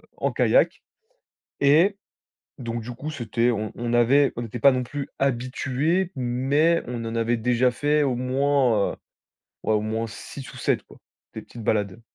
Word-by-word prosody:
en - - -1
kayak. - - +2 0.8
Et 160 +8 +4 0.6
donc 115 -2 -4
du 120 - -7
coup, 140 +6 -6
c'était, 120 -4 0
on 110 -2 -3
on 120 0 -2
avait 135 +4 +4
on 120 - -3
n'était 120 +1 -6
pas 140 - +7
non 130 0 0
plus 140 +3 -5
habitués, 135 +7 0
mais 135 +7 +1
on 120 -1 -4
en 115 0 -4
avait 115 +1 +1
déjà 125 +2 +2
fait 145 +4 +1
au 135 -3 +1
moins, 130 -3 +1
heu, - - -11 0.7
ouais 110 - +1
au 105 - +2
moins 110 +1 -2
6 125 +5 -9
ou - - -11
7 - - 0
quoi, - - -17 0.4
des - - -6
petites 120 - -11
balades. 105 0 -1
125 Hz, 175 wpm, -24 LUFS, 115-140 Hz, 0.8 s, pas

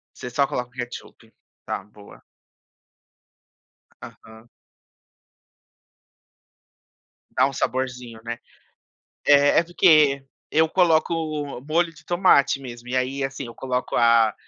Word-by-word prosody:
Você 125 - -7
só 140 +3 +1
coloca 125 -1 -4
o - - -34
ketchup. 120 -1 -9 0.3
Tá, - - -4
boa. 105 0 -17 1.8
Aham. 110 +1 -14 2.9
Dá - - +4
um 140 - -6
saborzinho, 125 -3 -3
né. 115 0 -5 0.9
É 145 0 +6
é, - - +1
porque 155 -5 +4 0.3
eu 160 +1 +3
coloco 170 -2 +2 0.5
molho 165 +2 +1
de - - -18
tomate 175 -6 +3
mesmo 120 -2 -10
e 130 - -2
aí, 130 +2 -1
assim, 135 0 -4
eu 115 - -11
coloco 125 -1 -3
a 115 -2 +4
130 Hz, 110 wpm, -23 LUFS, 120-150 Hz, 2.9 s, É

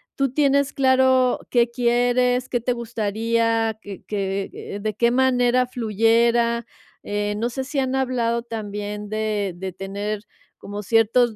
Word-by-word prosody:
¿tú 275 -2 0
tienes 280 -1 +2
claro 260 -1 +3
qué 240 -1 +3
quieres, 245 +1 +2
qué 240 -2 -1
te 250 - 0
gustaría, 225 0 0
qué 200 -2 -9
qué 195 0 -4
de 215 0 -2
qué 235 +1 +2
manera 250 -1 +3
fluyera? 235 0 +2 0.4
Eh, 205 0 -2
no 235 +3 -1
sé 265 +2 -4
si 285 0 -2
han 260 0 0
hablado 235 -3 0
también 210 -2 -5
de 215 -3 -1
de 190 0 -5
tener 200 +2 -4 0.4
como 205 +1 -7
ciertos 225 +2 +3
230 Hz, 135 wpm, -22 LUFS, 210-250 Hz, 0.4 s, claro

